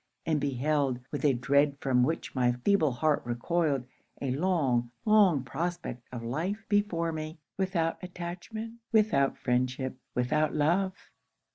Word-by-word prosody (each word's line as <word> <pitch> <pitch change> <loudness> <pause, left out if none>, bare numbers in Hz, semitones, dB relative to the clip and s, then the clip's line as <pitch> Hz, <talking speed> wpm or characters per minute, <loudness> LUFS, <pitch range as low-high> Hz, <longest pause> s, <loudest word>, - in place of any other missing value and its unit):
and 155 -3 +1
beheld, 140 -1 +1
with 145 - -4
a 145 - +5
dread 140 +3 +2
from 130 -3 +2
which 160 +6 -1
my 125 -2 +2
feeble 195 -8 +4
heart 150 +4 +1
recoiled, 135 +3 0 0.3
a 135 - -2
long, 135 -6 +1 0.2
long 200 - +5
prospect 165 -1 -4
of 120 -2 -6
life 175 - -3
before 205 -6 +1
me 155 +1 -5 0.2
without 185 -4 0
attachment, 180 +6 -6
without 210 - +3
friendship, 130 +1 -1 0.2
without 150 +5 +1
love. 180 +6 +2
155 Hz, 130 wpm, -29 LUFS, 130-175 Hz, 0.3 s, a